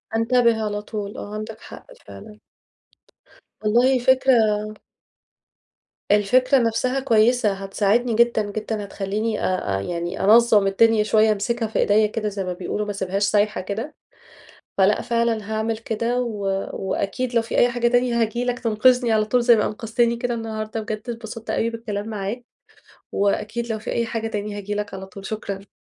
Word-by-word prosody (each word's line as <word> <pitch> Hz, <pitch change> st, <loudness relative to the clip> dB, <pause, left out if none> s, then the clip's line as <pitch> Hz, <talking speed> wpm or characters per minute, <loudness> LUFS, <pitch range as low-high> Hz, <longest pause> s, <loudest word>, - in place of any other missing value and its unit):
أنتبِه 230 Hz, -1 st, +2 dB
على 205 Hz, 0 st, -3 dB
طول، 210 Hz, -1 st, -6 dB
آه، 205 Hz, -, -7 dB
عندك 215 Hz, +1 st, -6 dB
حق -, -, -12 dB, 0.2 s
فعلًا. 210 Hz, 0 st, -12 dB, 1.2 s
والله 245 Hz, +4 st, +3 dB
فكرة 255 Hz, -3 st, +4 dB, 1.6 s
الفكرة 250 Hz, +7 st, +4 dB
نفسها 250 Hz, +2 st, +1 dB
كويسة، 230 Hz, -3 st, +3 dB
هتساعدني 200 Hz, +5 st, 0 dB
جدًا، 235 Hz, -1 st, +3 dB
جدًا، 215 Hz, 0 st, -4 dB
هتخليني 210 Hz, +3 st, -3 dB
آآ 185 Hz, -, -1 dB
آآ، -, -, -3 dB
يعني 170 Hz, -, -4 dB
أنظم 220 Hz, -1 st, +5 dB
الدنيا 220 Hz, +2 st, +3 dB
شوية 215 Hz, +1 st, +3 dB
أمسكها 225 Hz, +3 st, -1 dB
في 220 Hz, -, -2 dB
إيديا 210 Hz, +1 st, +4 dB
كده 215 Hz, 0 st, -3 dB
زي 200 Hz, -1 st, -4 dB
ما 180 Hz, -1 st, -3 dB
بيقولوا 190 Hz, +4 st, -3 dB
ما 205 Hz, -, -3 dB
أسيبهاش 195 Hz, 0 st, -2 dB
سايحة 210 Hz, 0 st, +1 dB
كده، 220 Hz, +10 st, -5 dB, 0.8 s
فلأ 195 Hz, +2 st, +4 dB
فعلًا 230 Hz, -2 st, -1 dB
هاعمل 220 Hz, +1 st, -1 dB
كده 230 Hz, +2 st, -2 dB
و 210 Hz, -5 st, -4 dB, 0.3 s
وأكيد 200 Hz, +6 st, -3 dB
لو 230 Hz, -, +3 dB
في 230 Hz, -, -4 dB
أي 240 Hz, -, +5 dB
حاجة 240 Hz, 0 st, +1 dB
تانية 245 Hz, -1 st, +1 dB
هاجي 230 Hz, +2 st, 0 dB
لك 245 Hz, 0 st, -1 dB
تنقذني 240 Hz, +1 st, +3 dB
على 215 Hz, -1 st, +3 dB
طول 245 Hz, +3 st, +1 dB
زي 235 Hz, -1 st, +6 dB
ما 210 Hz, -, +1 dB
أنقذتني 230 Hz, +2 st, 0 dB
كده 240 Hz, +1 st, -2 dB
النهاردة 220 Hz, -1 st, -4 dB
بجد 215 Hz, +2 st, -5 dB
اتبسطت 225 Hz, -1 st, -7 dB
أوي 230 Hz, -, 0 dB
بالكلام 220 Hz, -2 st, -5 dB
معاك، 215 Hz, +3 st, -4 dB, 0.7 s
وأكيد 210 Hz, +4 st, -1 dB
لو 220 Hz, -, -3 dB
في -, -, -6 dB
أي 235 Hz, -, 0 dB
حاجة 225 Hz, 0 st, -3 dB
تاني 210 Hz, -1 st, -4 dB
هاجي 205 Hz, 0 st, -4 dB
لك 205 Hz, 0 st, -4 dB
على 190 Hz, 0 st, -6 dB
طول، 195 Hz, +1 st, -11 dB
شكرًا. 200 Hz, -2 st, -6 dB
220 Hz, 165 wpm, -22 LUFS, 205-235 Hz, 1.6 s, زي